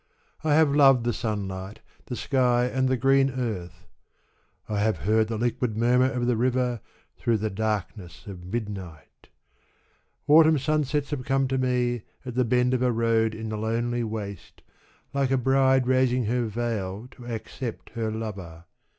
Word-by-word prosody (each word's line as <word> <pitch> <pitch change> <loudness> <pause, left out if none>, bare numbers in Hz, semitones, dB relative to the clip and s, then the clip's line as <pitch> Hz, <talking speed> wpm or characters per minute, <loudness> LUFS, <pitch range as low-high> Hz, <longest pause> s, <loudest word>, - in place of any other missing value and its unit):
I 155 -2 +3
have 155 -2 +4
loved 135 -4 +6
the 120 0 0
sunlight, 100 -3 -4 0.3
the 125 - -4
sky 125 -2 +2
and 130 +1 0
the 130 - +1
green 135 +2 +3
earth; 95 -9 -5 0.8
I 105 -1 -2
have 110 -2 +1
heard 110 +1 +3
the 115 0 -3
liquid 120 -1 -1
murmur 125 +3 +3
of 125 -1 -1
the 125 -1 +2
river 125 -1 0 0.4
through 115 -2 +1
the 110 0 -2
darkness 95 -3 -4
of 95 -3 -9
midnight; 100 -8 -7 1.0
Autumn 155 +1 +6
sunsets 150 0 0
have 140 -4 -3
come 135 +1 +1
to 130 0 0
me 125 -2 0 0.2
at 125 - -5
the 125 +1 +2
bend 125 +2 +2
of 125 - +1
a 125 -1 +3
road 115 -1 +1
in 110 0 -5
the 110 - -3
lonely 120 +2 -1
waste, 105 -4 -7 0.5
like 140 -1 +1
a 135 - +2
bride 130 0 +3
raising 130 -1 +2
her 120 +2 0
veil 110 -2 -3
to 120 - -13
accept 115 +1 -6
her 115 -2 -2
lover. 95 -7 -6
120 Hz, 160 wpm, -26 LUFS, 110-130 Hz, 1.0 s, loved